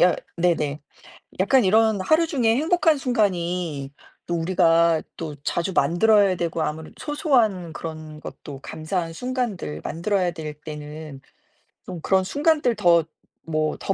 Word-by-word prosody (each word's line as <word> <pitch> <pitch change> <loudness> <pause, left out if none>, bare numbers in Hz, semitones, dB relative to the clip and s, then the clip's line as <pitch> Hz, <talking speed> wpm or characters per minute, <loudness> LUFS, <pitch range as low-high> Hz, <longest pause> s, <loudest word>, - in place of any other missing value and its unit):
야 180 - +5 0.2
네네. 160 -4 0 0.6
약간 245 +4 +4
이런 220 +1 +3
하루 315 - +3
중에 240 -8 +2
행복한 320 +1 +3
순간이 180 - -1 0.3
또 175 - -2
우리가 170 -1 +3
또 155 -3 -6
자주 175 +3 -1
만들어야 200 +3 +4
되고 170 -1 -2
아무래도 155 +1 -4
소소한 240 - +1
그런 155 -1 -7
것도 140 -3 -9
감사한 165 +2 -3
순간들 225 - -3
만들어야 180 +1 0
될 155 -2 -6
때는 150 -2 -8 0.7
좀 180 -3 -7
그런 190 -1 +2
순간들 290 - +1
더 170 -5 +4 0.4
뭐 155 -1 -1
더 195 - -1
175 Hz, 270 characters per minute, -23 LUFS, 160-220 Hz, 0.7 s, 야